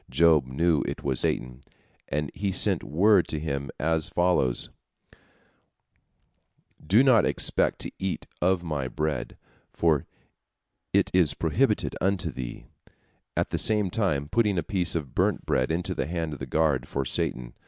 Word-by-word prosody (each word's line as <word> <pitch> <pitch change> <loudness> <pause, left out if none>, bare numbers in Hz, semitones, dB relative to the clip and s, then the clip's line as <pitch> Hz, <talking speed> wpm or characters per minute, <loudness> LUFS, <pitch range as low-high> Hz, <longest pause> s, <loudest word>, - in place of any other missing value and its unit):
Job 75 -1 +4
knew 80 +4 +1
it - - -5
was 65 -3 0
Satan, 65 +1 -1 0.5
and 75 -1 -2
he 100 +2 -2
sent 95 - +3
word 95 +4 +3
to 80 - -3
him 70 -3 -3
as 80 +1 +1
follows, 85 -9 +1 2.1
"Do 100 - +4
not 130 -5 +5
expect - - +1
to - - -3
eat 95 -1 -3 0.2
of 90 0 +2
my 75 -6 -3
bread, 75 0 -3 0.3
for 80 -5 +1 0.8
it - - +2
is 85 -6 +4
prohibited 80 -1 0
unto 95 -2 0
thee," 60 -2 -7 0.7
at - - 0
the - - -1
same 105 -4 +3
time 80 -10 0
putting 105 +1 +1
a 85 - 0
piece 90 -6 0
of 75 -6 -4
burnt - - 0
bread 65 - 0
into 85 +2 -1
the - - -3
hand 80 -2 -3
of 70 - -8
the - - -6
guard 75 -5 +1
for 70 -1 -3
Satan. 60 -1 -3
80 Hz, 155 wpm, -26 LUFS, 70-90 Hz, 2.1 s, not